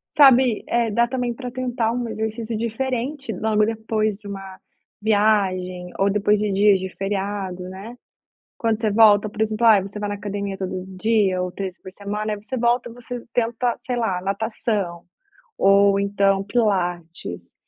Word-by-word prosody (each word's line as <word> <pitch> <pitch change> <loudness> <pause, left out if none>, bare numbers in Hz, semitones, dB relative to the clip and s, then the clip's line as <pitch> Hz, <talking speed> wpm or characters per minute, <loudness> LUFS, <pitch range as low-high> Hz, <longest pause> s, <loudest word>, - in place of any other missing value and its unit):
Sabe, 260 -5 +6
eh, 235 -2 +1
dá 235 +3 +3
também 245 -1 -2
para 250 +1 -6
tentar 245 -3 -1
um 240 0 -2
exercício 220 +1 -3
diferente 250 +3 -3
logo 215 +2 +1
depois 215 -2 -1
de 210 - -12
uma 195 -1 -8 0.4
viagem 195 -4 +1
ou 195 - +2
depois 210 +1 +2
de 210 0 -1
dias 200 0 +4
de 190 - -3
feriado, 195 -2 -3
né. 200 +6 -9 0.6
Quando 225 -2 0
você 220 -2 +1
volta, 210 -1 +6
por 215 +1 -6
exemplo, 220 +1 +1
ai 215 -4 +7
você 200 +2 -8
vai 205 0 -2
na 205 - -2
academia 200 0 -4
todo 185 -1 -4
dia 200 -3 +2
ou 180 - -3
3 190 0 -5
vezes - - -39
por 185 - -10
semana 210 +2 -3
aí - - -4
você 240 +5 -5
volta, 240 +1 +1
você 245 0 -7
tenta, 235 +1 0
sei 250 - -3
lá, 205 -7 -1
natação, 200 -3 -2 0.5
ou 200 0 +5
então 200 -1 +2
pilates, 175 - -2
210 Hz, 165 wpm, -22 LUFS, 195-230 Hz, 0.6 s, ai